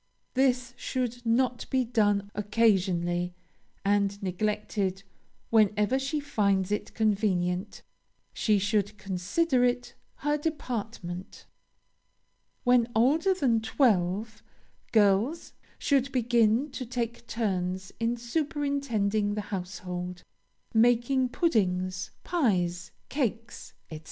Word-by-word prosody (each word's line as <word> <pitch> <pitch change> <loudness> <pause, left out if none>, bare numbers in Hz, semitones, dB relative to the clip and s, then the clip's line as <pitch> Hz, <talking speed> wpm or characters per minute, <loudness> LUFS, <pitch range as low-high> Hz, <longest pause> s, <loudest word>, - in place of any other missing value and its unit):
This 250 -2 +1
should 245 -1 -3
not 245 +1 +1
be 260 -1 +1
done 205 -4 +1
occasionally, 185 -5 +1 0.5
and 200 0 +2
neglected 195 0 -1 0.5
whenever 215 +3 +3
she 275 +3 -1
finds 200 -9 +1
it 210 - -3
convenient 200 -3 0 0.5
she 215 -2 +2
should 205 +1 0
consider 210 - 0
it 245 0 0 0.3
her 295 0 +2
department. 225 - -5 1.2
When 245 -2 +3
older 310 - +3
than 245 -10 +2
twelve, 215 -3 +1 0.5
girls 215 - +2 0.2
should 275 -1 +1
begin 240 +2 +2
to 260 - -5
take 235 -1 -4
turns 190 -5 -2
in 230 +1 0
superintending 240 -7 -1
the 210 - -1
household 180 -1 -5 0.5
making 245 +3 +3
puddings, 185 - 0
pies, 180 - 0 0.2
cakes, 240 -4 -3 0.2
&c. 155 - -6
220 Hz, 95 wpm, -28 LUFS, 195-250 Hz, 1.2 s, whenever